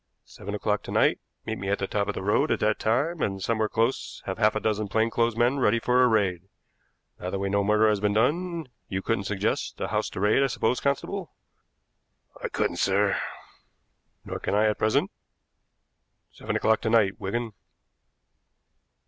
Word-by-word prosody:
Seven 100 +2 -7
o'clock 105 0 0
to - - -8
night - - +3 0.3
meet 110 - -4
me 95 - -4
at 100 - +1
the 95 - -2
top 100 +1 -1
of 105 - -2
the - - -4
road 120 +10 +2
at - - +1
that 105 0 +1
time, 145 +10 0
and 95 -1 -1
somewhere 110 +2 0
close 115 +5 -1
have 95 +2 -4
half 105 -1 +3
a - - +1
dozen 110 -1 -1
plain 110 +3 +1
clothes 115 -1 +1
men 120 +4 +2
ready 115 -2 +3
for 125 +2 +3
a - - +6
raid. 100 -5 0 0.7
Now 90 - -4
that 100 - -2
we 100 0 -2
know 100 0 +2
murder 105 +2 +4
has 105 -1 +2
been 105 0 0
done, 165 +6 0 0.2
you 95 -1 -3
couldn't 115 -3 -1
suggest 105 +1 -2
a - - -2
house - - -1
to - - -7
raid, 105 +6 +3
I 135 - +3
suppose, 125 -1 0
constable." 165 +7 -2 1.1
"I - - 0
couldn't, - - -1
sir." - - +2 1.1
"Nor - - -5
can - - -1
I 105 +1 +4
at 105 -1 +1
present. 110 0 +1 1.2
Seven - - -5
o'clock 110 0 +2
to 110 - -1
night, 110 -4 +3
Wigan." 115 +4 -3
110 Hz, 190 wpm, -26 LUFS, 100-120 Hz, 1.2 s, a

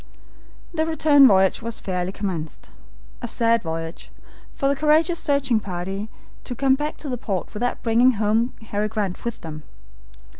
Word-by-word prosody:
The 315 -1 0
return 300 -4 +6
voyage 190 -3 +3
was 230 0 -5
fairly 180 -1 -2
commenced. 180 -6 -5 0.5
A 240 - -3
sad 230 0 +2
voyage, 165 -1 -5 0.5
for 275 - 0
the 280 - +2
courageous 310 +4 +3
searching 275 -5 +1
party 195 +2 -5 0.3
to 245 - -6
come 270 +2 +3
back 295 +3 -2
to 300 - -8
the 250 -2 -3
port 195 -6 -3
without 245 +3 -2
bringing 240 +3 +4
home 220 +3 +1 0.2
Harry 205 +1 0
Grant 210 -4 -3
with 235 -1 -4
them! 155 -2 -7
230 Hz, 155 wpm, -23 LUFS, 190-270 Hz, 0.5 s, return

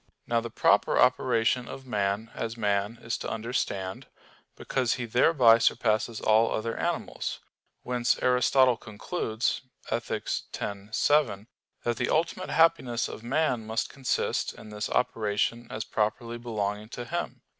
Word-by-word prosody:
Now 115 0 +1
the 115 - -5
proper - - +3
operation 120 +2 +3
of 135 - -8
man 105 -1 -1
as 115 0 -4
man 105 +1 0
is 115 - -2
to - - -4
understand; 110 -5 -3 0.5
because 130 -3 0
he 125 - -4
thereby 120 -1 +5
surpasses 110 0 +1
all 110 +1 +4
other 115 +1 -2
animals. - - -3 0.4
Whence 125 -1 +1
Aristotle 125 0 +4
concludes 110 +1 -2 0.3
(Ethic. - - -2 0.4
x, 100 0 -5
7) 125 -9 +2 0.4
that 120 -1 -1
the - - -1
ultimate 170 +3 0
happiness 160 -8 +3
of - - -8
man 125 -2 0
must 110 0 -1
consist 135 -2 -1
in 110 - -12
this 105 0 -4
operation 115 0 0
as 110 - -4
properly 115 +3 -2
belonging 105 -2 -3
to 120 0 -6
him. 120 - -4
115 Hz, 135 wpm, -28 LUFS, 110-125 Hz, 0.5 s, thereby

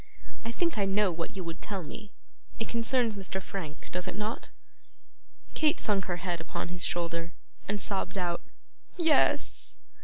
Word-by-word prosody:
I 230 - -2
think 335 -1 +1
I 200 - +4
know 195 0 +4
what 165 +2 -3
you 190 - -3
would 165 -1 -5
tell 195 -3 -3
me. 210 +6 -7 0.5
It 225 - -2
concerns 235 -1 +2
Mr. 190 -1 -2
Frank, 180 -5 -6
does 180 0 +1
it - - -2
not?' 210 +2 -2 1.0
Kate 310 +1 +3
sunk 200 -3 +2
her 175 -1 -1
head 175 -1 -1
upon 165 - -3
his 175 -1 -1
shoulder, 170 -1 0 0.3
and 205 +1 0
sobbed 195 -1 +1
out 175 -2 +1 0.6
'Yes. 325 -3 +3
195 Hz, 160 wpm, -31 LUFS, 175-215 Hz, 1.0 s, I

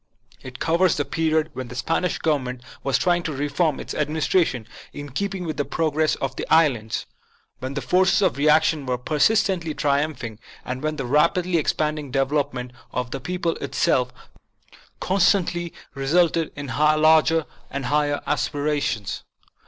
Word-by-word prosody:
It 130 -1 -9
covers 170 +1 +2
the 145 - 0
period 160 -1 0
when 130 -3 -5
the 125 - -9
Spanish 165 +7 0
Govern 150 -4 +1
ment 125 0 -6 0.2
was 135 -1 +2
trying 175 -1 +2
to 165 - -3
reform 145 +2 0
its - - -6
administration 150 - 0 0.2
in 145 -1 -8
keeping 195 +4 -3
with 155 -2 -4
the 145 - +1
progress 155 0 0
of 135 -1 -4
the - - -4
islands; 125 -9 +2 0.5
when 130 +2 -5
the 140 - -3
forces 185 +8 +3
of 190 - +2
reaction 150 0 +3
were 125 -1 0
persistently 165 - +1
triumphing; 140 -6 -1 0.3
and 130 +1 -4
when 155 0 -1
the 135 -4 -4
rapidly 170 +6 +2
expanding 150 -2 -1
development 135 -1 -1 0.2
of 125 -1 -3
the 135 - -3
people 175 +4 -2
itself 125 -2 +1 0.9
con 190 +2 0
stantly 175 -3 +2 0.2
resulted 160 +4 +2
in 145 - -6
larger 155 +1 +4 0.3
aspirations. 145 -3 -1
150 Hz, 145 wpm, -23 LUFS, 135-165 Hz, 0.9 s, larger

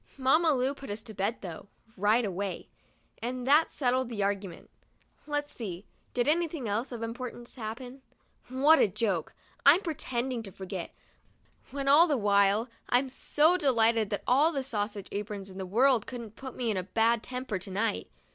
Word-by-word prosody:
Mamma 310 +5 +4
Lu 260 +2 +1
put 275 -1 -10
us 210 +2 -5
to 220 -2 -10
bed, 205 +4 -2
though, 175 0 -8 0.3
right 215 +5 +3
away, 195 0 -4 0.5
and 250 +1 -3
that 295 +4 +5
settled 255 -2 0
the 210 -4 -2
argument. 195 -3 -3 0.6
Let's 290 0 -2
see. 195 -4 -6 0.3
Did 245 +1 +1
anything 315 -4 0
else 220 +6 -1
of 235 -2 -5
importance 240 +1 -6
happen? 245 +3 -7 0.5
What 280 +5 +5
a - - +5
joke! 195 -4 -2 0.3
I'm 300 +7 +7
pretending 260 - -3
to 200 -3 -9
forget, 190 -1 -7 0.7
when 275 0 -4
all 300 +5 +7
the 295 -4 +1
while 200 +1 +3 0.2
I'm 255 +2 +2
so 305 +6 +2
delighted 230 - +3
that 205 - -3
all 285 +6 +4
the 275 -4 -2
sausage 205 -5 -3
aprons 200 -1 -5
in 190 - -9
the 190 - -4
world 240 +3 +3
couldn't 235 -4 -7
put 265 -1 -8
me 240 -3 -1
in 205 - -1
a 185 - -1
bad 225 +4 +2
temper 250 -6 -4
to 190 - -8
night. 210 +3 -1
235 Hz, 175 wpm, -29 LUFS, 205-265 Hz, 0.7 s, I'm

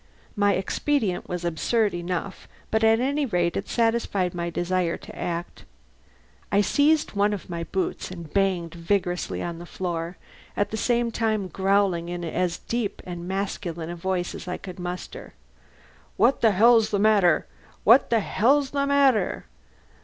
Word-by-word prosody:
My 205 -1 +3
expedient 205 0 -1
was 175 -1 -3
absurd 205 +6 +1
enough, 175 +2 -4 0.2
but 220 0 +1
at 225 0 +5
any 280 +4 0
rate 175 -9 0
it - - -3
satisfied 225 -6 +1
my 170 -1 -3
desire 175 0 -1
to - - -12
act. 170 0 -4 0.9
I 200 - +4
seized 300 +7 +2
one 205 0 +2
of 195 -3 -7
my 170 -1 -3
boots 190 +1 -3
and 170 -4 -9
banged 185 -4 +1
vigorously 175 +1 -1
on 170 -1 -5
the 175 - -9
floor, 170 -1 -4 0.4
at 205 0 0
the - - -2
same 235 +1 +1
time 215 -3 0
growling 190 -3 +1
in 175 0 -4
as 170 +1 -1
deep 235 -4 -3
and 175 -1 -6
masculine 180 -4 -3
a - - -5
voice 180 0 -2
as - - -8
I 180 - -3
could 185 -2 -9
muster: 180 0 -7 0.8
"What 235 +6 +3
the 225 - +6
hell's 220 +2 +5
the 205 - 0
matter? 200 -5 +4 0.4
What 235 +6 +6
the 230 -2 +3
hell's 270 +8 +2
the 280 -1 0
matter?" 275 -8 +2
195 Hz, 160 wpm, -25 LUFS, 175-225 Hz, 0.9 s, the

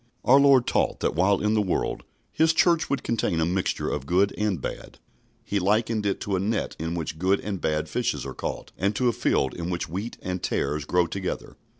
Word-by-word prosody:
Our 135 +3 +7
Lord 135 -3 +6
taught - - 0
that - - +1
while 95 +5 +2
in 105 +1 +1
the 110 - +3
world 95 -3 -1 0.3
His 160 +1 +3
Church 170 0 +3
would 140 - -1
contain 105 -7 0
a 80 - +2
mixture 90 +2 -1
of 65 - -3
good 95 +4 +2
and 105 -5 -1
bad. - - -7 0.5
He 100 - 0
likened 105 +2 +1
it 100 - -1
to 100 - -1
a - - 0
net 105 +3 -1
in 80 +2 -3
which 80 -2 -4
good 95 +3 +2
and 100 -3 -4
bad 75 -1 0
fishes - - -2
are - - -5
caught, - - -5
and 100 +3 +1
to 125 +3 +2
a - - 0
field 65 - +1
in 85 0 -4
which 85 -1 -2
wheat 100 +8 -5
and 90 -1 -3
tares 75 +1 -1
grow 90 +2 +2
together. 95 +1 -5
95 Hz, 220 wpm, -25 LUFS, 85-110 Hz, 0.5 s, Our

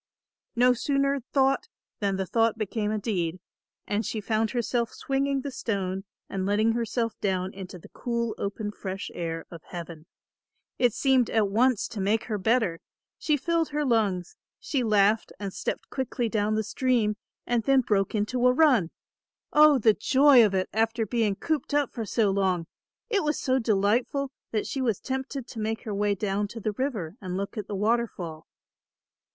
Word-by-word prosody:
No 250 +1 +5
sooner 275 +2 +1
thought 270 +8 +2 0.3
than 200 -2 0
the 190 0 -1
thought 225 +4 +2
became 215 0 -2
a 215 - 0
deed, 185 -5 -2 0.5
and 210 +2 -1
she 220 - -3
found 220 +1 0
herself 240 -1 -1
swinging 275 0 -1
the 280 - -5
stone 195 -6 -3 0.2
and 190 -1 -3
letting 210 +3 +2
herself 230 0 -1
down 190 -1 -1
into 190 -1 -8
the 170 - -15
cool 235 -2 -2
open 205 +1 -3
fresh 195 -1 -6
air 165 -1 -4
of 170 -2 -9
heaven. 170 -2 -8 0.7
It 245 -4 +3
seemed 260 -4 +3
at 215 -3 +2
once 235 +2 +2
to 225 -4 -5
make 210 +3 +1
her 215 -3 -3
better; 220 -5 +1 0.4
she 300 -2 +1
filled 330 +3 0
her 295 0 -1
lungs, 205 -8 +1 0.2
she 275 - -1
laughed 215 0 +3
and 200 -2 -4
stepped - - -4
quickly 255 -2 -2
down 215 -1 0
the 220 - 0
stream, 220 -1 +1 0.3
and 240 -1 +1
then 270 -1 +5
broke 205 -4 0
into 245 +4 +1
a - - +6
run. 255 - +4 0.6
Oh, 300 -1 +7
the 220 -3 +5
joy 265 +3 +6
of 200 -3 +2
it 185 0 +1
after 225 +1 +1
being 215 -2 0
cooped 305 +4 -2
up 290 -3 +1
for 225 -3 -4
so 215 -3 +2
long. 190 -3 +1 0.5
It 405 -3 +3
was 300 0 0
so 260 -1 +1
delightful 230 +5 +1 0.2
that 215 -2 -1
she 270 - -3
was 230 -6 0
tempted 265 0 -4
to 235 - -9
make 220 +1 -2
her 215 -3 -4
way 205 0 +1
down 205 +1 -1
to 230 +3 -8
the 215 0 -1
river 210 - -3
and 185 -1 -4
look 200 +4 -4
at 210 -3 -5
the 205 - -4
waterfall. 195 -7 -1
220 Hz, 180 wpm, -27 LUFS, 200-255 Hz, 0.7 s, Oh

